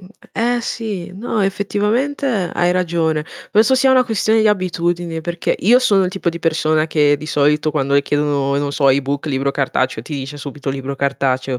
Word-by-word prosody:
Mh, 185 - -14 0.3
eh, 240 +2 0
eh, - - -2
sì, 215 -6 -5
no 215 +1 -2
effettivamente 210 +8 -1 0.3
hai 175 0 +2
ragione. 165 -4 0 0.3
Penso 225 +5 +4
sia 265 +1 +3
una 255 -1 +5
questione 220 -1 +1
di 215 - +4
abitudini, 175 -3 -1
perché 175 +1 -2
io 240 +6 +5
sono 200 -7 +3
il 180 - -1
tipo 185 -2 -3
di 170 0 -3
persona 155 -1 +1
che 150 -2 +3
di 155 - -9
solito 150 +1 +2
quando 140 -2 0
le 140 - +4
chiedono, 140 -1 0
non 145 0 -1
so, 140 -1 +2
e-book, 140 +2 0
libro 140 -1 0
cartaceo, 130 -4 -1
ti 150 - -7
dice 140 +1 -6
subito 145 -1 -6
libro 135 0 -5
cartaceo, 135 -2 -1
160 Hz, 190 wpm, -18 LUFS, 140-200 Hz, 0.3 s, una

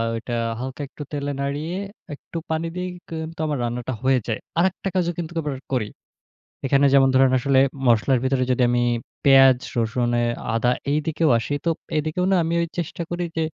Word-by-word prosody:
ওইটা 120 +1 -5 0.3
হালকা 130 +2 -5
একটু 150 - -9
তেলে 145 -1 -2
নাড়িয়ে 145 +5 -2 0.4
একটু 165 - -9
পানি 160 +1 -1
দিয়েই 180 0 -3 0.2
কি - - -9
কিন্তু 160 0 -9
আমার 145 -2 -1
রান্নাটা 120 +2 -3
হয়ে 130 -1 +4
যায়। 110 - -1 0.2
আরেকটা 190 +2 +1
কাজও 175 -1 +2
কিন্তু 170 -1 -4
আবার 145 -3 -3 0.2
করি। 110 -5 0 0.8
এখানে 140 +1 +4
যেমন 135 -1 +6
ধরেন 130 0 +5
আসলে 135 +1 +3 0.3
মসলার 120 +3 +4
ভিতরে 130 -1 +1
যদি 125 - +1
আমি 120 0 +2 0.4
পেঁয়াজ, 135 -2 +7 0.2
রসুন 120 +2 0
এ - - +1 0.3
আদা, 120 +2 +2 0.2
এইদিকেও 155 +1 +1
আসি, 115 +5 -3
তো - - +3 0.3
এদিকেও 155 +4 0
না - - +5
আমি 165 - -1
ওই 170 - -1
চেষ্টা 170 0 -3
করি 175 0 -2
যে 160 - +2
140 Hz, 180 wpm, -23 LUFS, 130-165 Hz, 0.8 s, পেঁয়াজ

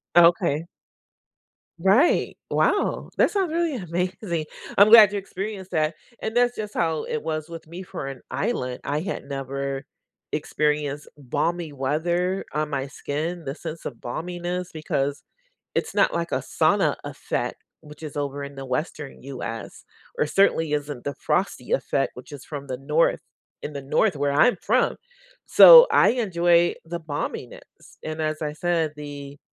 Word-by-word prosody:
Okay. 170 -2 +4 1.1
Right. 195 - +3
Wow. 410 - +1
That - - +4
sounds 380 -6 0
really 335 -3 0
amazing. 180 -3 -3 0.3
I'm 200 +2 +8
glad 215 -3 +9
you - - -1
experienced 195 0 -6
that, 155 0 +1 0.3
and 220 - -3
that's 245 0 +3
just 210 -1 -5
how 160 -2 0
it 155 - -3
was 155 -1 -3
with 165 -1 -9
me 175 +4 -8
for 180 -6 -6
an 135 -2 -7
island. 130 - -2
I 145 +1 -1
had 190 - -4
never 140 0 -4 0.5
experienced 150 -1 -1
balmy 160 +4 -2
weather 170 +7 -1
on 155 0 -1
my 140 -2 -2
skin, 160 +4 -4
the 135 +1 -4
sense 165 0 -7
of 125 - -4
balminess, 175 +6 -4
because 145 -2 -2 0.5
it's - - -1
not - - +3
like 170 0 -2
a - - +2
sauna - - +2
effect, - - -3 0.2
which 150 +1 -14
is 150 -2 -7
over 140 0 -3
in 140 0 -9
the 135 0 -7
Western 135 +2 -4
US, 125 -4 -7 0.3
or - - +2
certainly 165 -2 +2
isn't 145 -3 -3
the 145 - -3
frosty 180 -9 -1
effect, 135 0 0
which 125 +4 -12
is 140 -3 -9
from 140 -2 -7
the 130 -1 -4
North, 150 +5 +2 0.4
in 150 - -5
the 140 -1 -6
North 155 +6 +1
where 140 0 0
I'm 235 - +4
from. - - +2 0.5
So - - +10
I - - +5
enjoy 175 -7 +3
the 170 +1 -5
balminess 150 -3 -5 0.4
and, 155 0 -4
as 155 0 -2
I 150 -1 -2
said, 165 0 0
the 145 -1 -8
155 Hz, 155 wpm, -24 LUFS, 145-180 Hz, 1.1 s, So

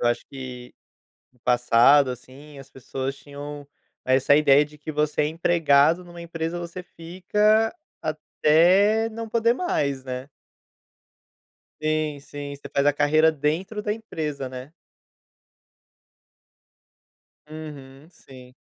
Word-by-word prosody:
eu 120 - +2
acho 120 0 -2
que 125 -2 -9 0.6
no 125 - -32
passado, 125 +3 +4
assim, 140 +4 -11
as 135 0 -13
pessoas 135 +1 -5
tinham 145 0 -9 0.4
essa 135 +2 +4
ideia 145 -1 +5
de 150 0 -16
que 155 +1 -6
você 150 0 0
é - - +1
empregado 165 0 +3
numa 175 -1 -11
empresa, 165 0 -4
você 170 +1 -7
fica 210 - 0 0.3
até 185 +8 +3
não 225 0 -6
poder 230 +1 +2
mais, 140 - -1
né. 130 +1 -6 1.5
Sim, 155 -2 -1
sim. 145 0 -8
Você 140 - -11
faz 140 +1 +1
a 145 - +5
carreira 155 +2 +3
dentro 160 +9 -2
da 210 - -1
empresa, 155 - -5
né. 130 +4 -9 2.8
Uhum, 150 -2 -10
sim. 130 -5 -16
150 Hz, 120 wpm, -24 LUFS, 135-170 Hz, 2.8 s, ideia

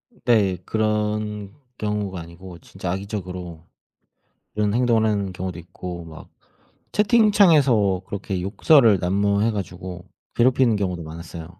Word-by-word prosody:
으 - - -25
네. 105 -6 +3
그런 105 -1 -1 0.2
경우가 105 -4 -3
아니고 85 +2 -11
진짜 95 -2 -6
악의적으로 90 -4 -6 0.9
이런 105 -1 0
행동을 115 -2 +2
하는 100 -2 -2
경우도 90 -1 -5
있고 85 0 -8
막 80 -1 -12 0.7
채팅창에서 165 - +4
그렇게 100 -2 -4
욕설을 110 - +4
난무해 100 +4 +1
가지고 90 -3 -6 0.3
괴롭히는 125 -1 +3
경우도 90 -4 -2
많았어요. 85 +2 -9
100 Hz, 300 characters per minute, -22 LUFS, 90-110 Hz, 0.9 s, 채팅창에서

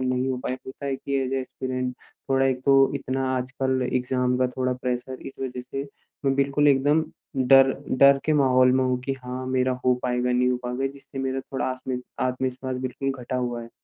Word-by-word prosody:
नहीं 130 0 0
हो 130 - -1
पाए 130 - -1
होता 135 +2 -7
है 135 -1 -1
कि 140 +1 -3
ऐज़ 130 +1 -2
अ - - +1
एस्पिरैंट 130 -1 -4 0.4
थोड़ा 135 0 +4
एक 130 -1 0
तो 140 - +6 0.2
इतना 135 -1 -2
आजकल 130 +1 -1
एग्ज़ाम 125 0 +1
का 130 - +3
थोड़ा 130 0 +1
प्रेशर 125 +1 -3
इस - - -6
वज़ह 125 -1 -4
से 135 +2 -5 0.4
मैं 135 -1 +3
बिल्कुल 140 +1 +3
एकदम 145 +3 +3 0.4
डर 135 -1 +7 0.3
डर 140 0 +7
के 155 - +3
माहौल 130 -2 +5
में 130 0 +3
हूँ 125 -1 +1
कि 135 +1 -2
हाँ, 125 +1 -5
मेरा 130 0 +1
हो 125 - +5
पाएगा, 125 0 0
नहीं 125 0 +3
हो 125 - +1
पाएगा 125 +2 -1
जिससे 135 0 -11
मेरा 135 0 -1
थोड़ा 135 0 -4
आस्म 130 0 -3 0.2
आत्मविश्वास 130 0 -2
बिल्कुल 135 +1 -2
घटा 125 +1 -3
हुआ 120 -2 -2
है। 115 - -11
130 Hz, 205 wpm, -25 LUFS, 125-135 Hz, 0.4 s, डर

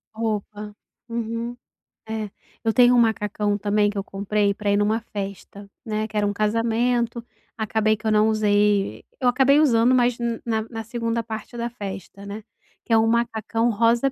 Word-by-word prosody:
Roupa. 210 -1 -3 0.4
Uhum. 230 +1 -3 0.5
É, 220 -2 -3 0.3
eu 225 -1 +1
tenho 245 0 +6
um - - +5
macacão 210 -2 +1
também 205 0 +2
que 205 - -6
eu 195 - -1
comprei 200 +1 0
pra 205 0 -3
ir - - +3
numa 210 +2 +2
festa, 200 -1 -7 0.2
né, 215 -1 -1
que 215 - -15
era 205 - +2
um - - 0
casamento, 230 +2 0 0.3
acabei 220 0 +1
que 220 - -16
eu 220 - +2
não 215 +1 +4
usei 205 -2 +2 0.2
eu 255 - +1
acabei 270 +3 +4
usando, 245 -4 +4
mas 245 -1 +2 0.3
na 220 -2 0
na 225 -1 -5
2º 230 0 -2
parte 220 +1 -7
da 235 0 -2
festa, 200 -3 -8
né, 205 +1 -7 0.4
que 230 - 0
é - - +7
um 220 0 +3
macacão 230 0 0
rosa 235 +4 +2
220 Hz, 175 wpm, -23 LUFS, 210-235 Hz, 0.5 s, é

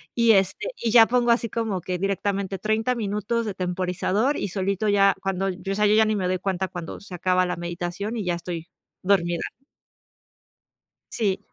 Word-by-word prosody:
Y, 235 -1 +5
este, 195 - +1
y 230 -2 -1
ya 225 -2 +8
pongo 240 -1 +2
así 235 -1 +1
como 215 -5 -2
que 180 +1 -3
directamente 195 0 -1
30 220 +5 0
minutos 215 +1 -1
de 210 - -3
temporizador, 185 +8 0
y - - -2
solito 195 +2 -1
ya 200 -1 +5
cuando, 195 0 -1
o 190 +1 -3
sea, 210 +1 +2
yo 210 - +4
ya 220 0 +5
ni 215 - +1
me 190 -3 -1
doy 185 0 0
cuenta 190 0 -1
cuando 175 -2 -7
se 200 -1 -12
acaba 185 +1 +2
la 180 - -2
meditación 175 +5 -4
y 210 - -2
ya 175 -1 0
estoy 170 -1 -6 0.4
dormida. 175 -3 +2 1.7
Sí. 200 -4 0
195 Hz, 180 wpm, -24 LUFS, 180-215 Hz, 1.7 s, ya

